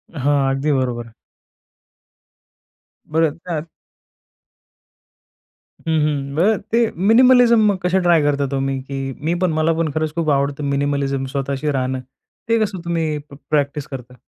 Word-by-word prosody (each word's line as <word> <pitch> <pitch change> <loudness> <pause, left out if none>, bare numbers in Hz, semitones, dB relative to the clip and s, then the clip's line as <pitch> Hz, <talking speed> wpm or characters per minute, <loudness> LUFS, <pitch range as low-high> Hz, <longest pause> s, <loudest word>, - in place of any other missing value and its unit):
हां, 140 0 +1
अगदी 140 +3 0
बरोबर. 120 -2 -3 2.0
बरं, 160 0 +1
त्यात. 165 -3 -3 2.2
हं, - - +1
हं. 140 -2 -2
बरं 200 +6 +3
ते 230 - +3 0.3
मिनिमलिझम 235 -4 +6
कसे 180 +1 +2
ट्राय 175 -3 +4
करता 140 -1 +1
तुम्ही? 135 0 -2
की 135 0 -5
मी 170 +2 +1
पण, 180 - +2
मला 160 +1 +2
पण 160 -3 0
खरंच 155 0 -2
खूप 165 -2 0
आवडतं 140 +1 0
मिनिमलिझम 140 -1 -1
स्वतःशी 140 +2 -1
राहणं. 130 -1 -1 0.5
ते 230 0 +3
कसं 195 -3 -3
तुम्ही 165 -3 -1
प - - -10
प्रॅक्टिस 145 -1 0
करता? 125 -2 -8
145 Hz, 130 wpm, -20 LUFS, 135-165 Hz, 2.2 s, मिनिमलिझम